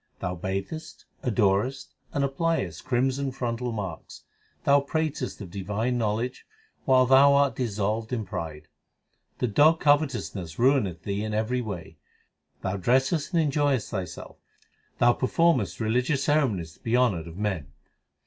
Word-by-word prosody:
Thou 90 - -2
bathest, 95 - -5 0.2
adorest, 115 +2 0 0.2
and 140 - 0
appliest 135 - -1
crimson 135 +2 0
frontal 125 -1 -3
marks. 95 -7 -6 0.4
Thou 140 0 +5
pratest 145 -2 -2
of 95 -4 -8
divine 105 +6 -2
knowledge 115 +3 -2 0.4
while 130 -1 +5
thou 135 +2 +6
art 140 -1 +3
dissolved 110 -1 -2
in 115 -4 -2
pride. 80 -4 -6 0.7
The - - 0
dog 155 +9 +4
covetousness 135 - 0
ruineth 120 - +2
thee 100 +1 -2
in 110 -1 -3
every 115 +4 0
way; 100 -7 -7 0.7
Thou 95 +2 -1
dressest 130 - +1
and 165 - +4
enjoyest 145 -6 +1
thyself; 95 -6 -6 0.6
Thou 120 0 +5
performest 135 - +1
religious 125 +5 +1
ceremonies 115 - +1
to - - -24
be 115 +2 +1
honoured 100 -11 +1
of 85 +1 -10
men. 95 -9 -2
120 Hz, 135 wpm, -26 LUFS, 100-135 Hz, 0.7 s, thou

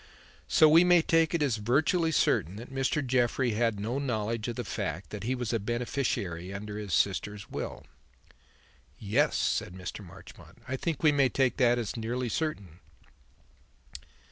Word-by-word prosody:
So 155 - +6
we 160 +3 +7
may 175 -2 +5
take 165 0 +2
it 160 - +1
as 130 -6 +1
virtually 155 - +1
certain 95 - +1
that 120 +5 -10
Mr. 135 +2 0
Jeffrey 125 0 +1
had 110 -1 0
no 115 +6 -2
knowledge 115 -4 -2
of 120 - -3
the 125 - -3
fact 95 -4 -4
that 105 0 -6
he 130 +2 0
was 125 -2 -3
a 115 - +1
beneficiary 110 -6 -2
under 105 +1 -6
his 105 -3 -6
sister's 100 +2 -1
will." - - -5 1.1
"Yes," 105 -1 +1
said 90 - -1
Mr. 95 +3 -7
Marchmont, 85 - -14
"I 130 - -2
think 160 +3 -3
we 155 - +6
may 140 -2 +3
take 130 -1 +1
that 120 -2 +4
as 115 -4 -3
nearly 120 +2 -3
certain." 100 - -3
120 Hz, 165 wpm, -29 LUFS, 105-135 Hz, 1.1 s, we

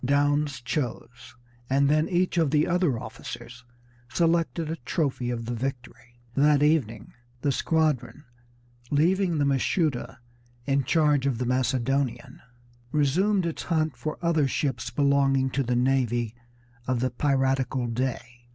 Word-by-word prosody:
Downes 145 0 +1
chose, 125 -1 -5 0.3
and 140 +1 +3
then 155 +2 +2
each 180 0 +1
of 160 -3 +2
the 150 +1 +3
other 175 -7 +1
officers 125 +3 -9 0.5
selected 165 -1 +1
a 165 - -3
trophy 130 -2 -2
of 115 -1 -3
the 120 - -3
victory. 120 -1 -6
That 145 +1 +4
evening 120 -8 0 0.3
the 140 - +1
squadron, 150 -2 0 0.7
leaving 175 +4 +2
the 145 - +2
Mashuda 140 -1 0 0.5
in 140 -1 +1
charge 150 -3 +2
of 130 -4 0
the 125 - -2
Macedonian, 130 0 -1 0.5
resumed 180 +7 +2
its 165 - -3
hunt 155 -4 0
for 150 +6 -5
other 160 -4 +2
ships 140 +1 -2
belonging 140 -2 +2
to 140 - 0
the 125 -1 0
navy 120 -3 +1 0.5
of 130 -1 0
the 130 +1 0
piratical 135 -1 0
Dey. 120 0 -3
140 Hz, 135 wpm, -26 LUFS, 125-155 Hz, 0.7 s, That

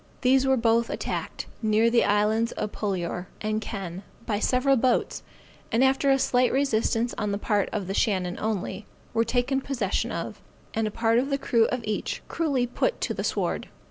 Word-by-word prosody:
These 265 +1 +4
were 265 0 +4
both 230 0 +2
attacked, - - -4 0.2
near 220 +1 +3
the 235 - +4
Islands 215 +3 +2
of 210 -1 -3
Polior 180 -3 -3
and 215 0 -1
Kenn, 190 -5 -5 0.2
by 205 -2 -1
several 255 +4 +3
boats, 250 0 +1 0.5
and 235 +3 +3
after 270 +1 +3
a 270 - +5
slight 250 -1 +2
resistance 240 -3 +1
on 210 0 -1
the 200 - 0
part 205 -1 0
of 210 -4 -2
the 190 - -3
Shannon 185 -4 0
only, 215 0 -3 0.3
were 230 0 +3
taken 245 +3 0
possession 245 -9 -1
of, - - -5 0.3
and 220 -1 0
a - - -1
part 230 +2 +2
of 270 +3 -1
the 275 - +1
crew 235 -4 +3
of 250 +1 -1
each, 215 -1 -3
cruelly 280 -7 0
put 365 - -1
to - - -1
the - - -4
sword. - - -1
230 Hz, 185 wpm, -26 LUFS, 210-255 Hz, 0.5 s, a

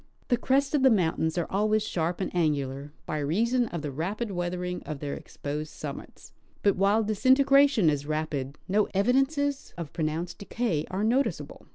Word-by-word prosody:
The 245 - +3
crests 275 +3 +1
of 295 - +3
the 265 - +6
mountains 165 -6 +1
are 170 - +1
always 215 +2 +2
sharp 175 -2 -2
and 185 - -3
angular, 145 -4 -1
by 155 - -2
reason 230 - +1
of 170 -6 -5
the 145 - -3
rapid 195 - -3
weathering 180 0 -3
of 155 - -6
their 145 -1 -4
exposed 150 +2 -6
summits, - - -9 0.3
but 200 - +4
while 200 +4 +3
disintegratioii 265 - +4
is 145 -1 -2
raj)id, 150 -3 -2
no 205 +2 +2
evidences 270 +6 +1
of 170 -4 -6
pronounced 165 +1 -3
decay 200 -7 -2
are 190 +3 -2
noticeable. 250 +6 -1
185 Hz, 165 wpm, -27 LUFS, 155-235 Hz, 0.3 s, the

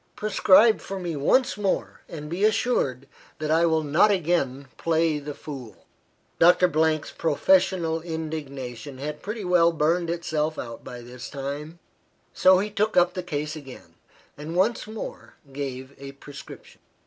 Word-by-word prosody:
Prescribe 215 +1 +5
for 195 - -6
me 175 -3 -4
once 225 - +2
more, 200 -2 -2
and 150 -2 -7
be 175 +6 -3
assured 140 - +1 0.3
that 155 0 -2
I 165 +2 +4
will 160 -1 +1
not 155 +8 +4
again 155 -8 0
play 160 -2 +1
the 145 0 -7
fool." 125 - -9 0.5
Doctor 180 +2 +6 0.4
's - - -9
professional 165 - +2
indignation 145 -6 -6
had 150 +2 -5
pretty 210 0 -5
well 175 -2 +4
burned 165 +2 +1
itself 160 -2 -1
out 115 -2 -7
by 125 -1 -8
this 125 +1 -9
time; 145 +4 -6 0.6
so 185 0 +6
he 205 +3 -1
took 210 0 0
up 175 0 +4
the 185 - -3
case 150 -3 -4
again, 130 - -11 0.4
and 155 +3 -7
once 215 +5 +1
more 220 0 -8 0.2
gave 135 -1 -5
a 140 0 -8
prescription. 140 0 -12
160 Hz, 150 wpm, -25 LUFS, 140-180 Hz, 0.6 s, Doctor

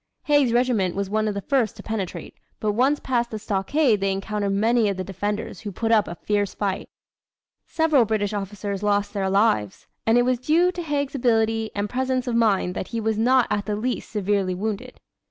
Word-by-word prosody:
Haig's 290 -5 +3
regiment 235 -7 +1
was 200 0 -3
one 215 0 +1
of 210 - -2
the 200 - -4
first 255 -5 +1
to 205 - -10
penetrate, 210 -5 -4 0.3
but 215 - 0
once 265 +7 +2
past 240 -2 -1
the 220 - -5
stockade 215 +4 +1
they 195 0 +1
encountered 200 +1 -2
many 220 +2 +2
of 195 - -2
the 185 - -2
defenders 205 +3 -4
who 210 - -6
put 225 +4 -2
up 215 -2 +4
a 170 - -6
fierce 205 +2 -1
fight. 195 -2 -2 0.8
Several 320 -6 +3
British 215 -1 -1
officers 200 0 -4
lost 205 -1 0
their 195 -2 -1
lives, 190 - +1 0.2
and 225 +2 +5
it 245 - +5
was 250 -1 +1
due 330 +7 +3
to 355 - -5
Haig's 290 -4 -2
agility 225 -4 +1
and 205 0 -1
presence 255 +1 -1
of 245 -2 -1
mind 205 -6 +2
that 185 - -4
he 230 - -3
was 220 0 0
not 250 +2 +4
at 205 -2 -1
the 210 - 0
least 240 +3 -3
severely 200 -3 0
wounded. 220 +6 -4
215 Hz, 205 wpm, -24 LUFS, 200-245 Hz, 0.8 s, and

